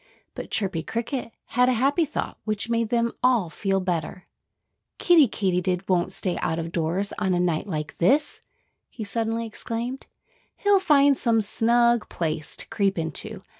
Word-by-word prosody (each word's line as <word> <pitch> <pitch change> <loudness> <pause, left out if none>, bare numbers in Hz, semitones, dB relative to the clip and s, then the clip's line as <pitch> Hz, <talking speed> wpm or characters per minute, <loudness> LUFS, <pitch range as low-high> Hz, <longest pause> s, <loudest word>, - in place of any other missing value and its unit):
But - - -7
Chirpy 190 -6 0
Cricket 230 - -4 0.2
had 250 +1 +3
a - - +3
happy 275 +7 +2
thought, - - -5
which 215 +1 -2
made 230 -1 +1
them 235 0 +1
all 240 -9 +2
feel 195 +1 0
better. 180 -1 -3 0.7
"Kiddie 335 -7 +5
Katydid 185 -2 -1
won't 180 0 +1
stay 185 -1 -1
out 160 - -1
of 165 0 -4
doors 175 +4 -1
on 190 -3 +1
a - - +1
night 175 +1 0
like 155 -5 -5
this!" 285 - +2 0.5
he 220 - -7
suddenly 225 +2 -2
exclaimed. 230 +3 -4 0.5
"He'll 405 -1 +3
find 285 -6 +4
some 230 -3 +2
snug 235 +2 +2
place 155 -2 -3
to - - -2
creep 200 -2 0
into. 190 +5 -3
215 Hz, 160 wpm, -25 LUFS, 180-240 Hz, 0.7 s, Kiddie